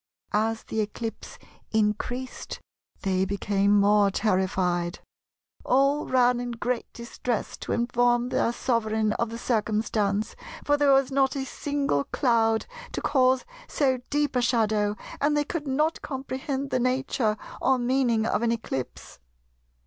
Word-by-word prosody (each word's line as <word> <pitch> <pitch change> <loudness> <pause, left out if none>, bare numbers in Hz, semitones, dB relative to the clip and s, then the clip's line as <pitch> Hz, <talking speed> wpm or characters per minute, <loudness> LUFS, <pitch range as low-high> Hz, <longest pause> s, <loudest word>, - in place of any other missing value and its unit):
As 220 +1 0
the 220 - -2
eclipse 220 +2 -5 0.3
increased 220 +4 -2 0.4
they 190 -1 +1
became 200 +1 +2
more 205 0 +4
terrified. 185 -3 0 0.7
All 275 +3 +2
ran 250 -1 +3
in 245 0 -4
great 240 +1 -3
distress 235 0 -4
to - - -6
inform 240 0 +2
their 235 - +1
sovereign 220 -3 0
of 235 - 0
the 230 - -6
circumstance, 215 -3 0 0.3
for 290 - +3
there 290 -1 +4
was 270 0 +4
not 270 0 +2
a 270 -1 -2
single 275 - -1
cloud 225 -3 +2 0.3
to - - -3
cause 260 -2 +3 0.2
so 260 -3 +1
deep 290 -1 0
a 250 - +3
shadow, 215 -4 +1 0.3
and 295 +1 +2
they 295 - +1
could 305 -1 -4
not 300 +4 0
comprehend 270 0 -4
the 255 - +1
nature 255 -3 0 0.2
or 265 0 +3
meaning 245 -3 +1
of 225 - 0
an 235 -1 +2
eclipse.... 175 - -5
235 Hz, 135 wpm, -26 LUFS, 215-265 Hz, 0.7 s, more